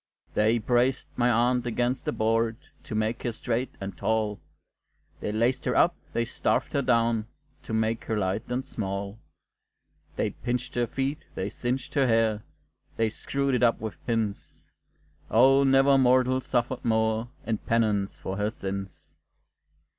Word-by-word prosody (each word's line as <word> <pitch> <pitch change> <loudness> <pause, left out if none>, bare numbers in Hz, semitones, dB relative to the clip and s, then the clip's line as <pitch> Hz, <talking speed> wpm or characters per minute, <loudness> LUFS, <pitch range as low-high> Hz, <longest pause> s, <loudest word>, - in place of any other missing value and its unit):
They 110 +2 +3
braced 120 +3 +1
my 120 0 +2
aunt 120 +1 +2
against 120 +2 -1
a - - +2
board, 115 +1 +1 0.3
To 125 -7 -5
make 110 +2 -1
her 120 - -1
straight 120 +2 -2
and 100 0 -5
tall; 110 -2 0 0.8
They - - -3
laced 120 +4 +1
her - - +1
up, 175 0 +4 0.2
they 115 - +1
starved - - -1
her 140 - +2
down, 115 -3 +2 0.3
To - - -7
make 110 +1 0
her 110 - -1
light 95 +1 0
and 125 +2 -2
small; 100 -3 -4 1.0
They - - 0
pinched 125 0 -3
her 120 -1 0
feet, 135 +5 -2 0.2
they 95 +2 -3
singed 130 +4 -3
her 135 -2 +3
hair, 115 -2 +2 0.6
They 115 -1 +1
screwed 140 +4 -1
it 125 - +1
up 120 -1 +4
with 110 -1 -7
pins 110 -4 -3 0.6
O 135 +4 +6
never 135 0 +5
mortal 130 0 +4
suffered 120 0 -1
more 110 0 +1 0.2
In 110 -2 -1
penance 105 -4 0
for 95 +1 -5
her 105 +1 +1
sins. 95 -3 -6
115 Hz, 155 wpm, -27 LUFS, 110-125 Hz, 1.0 s, O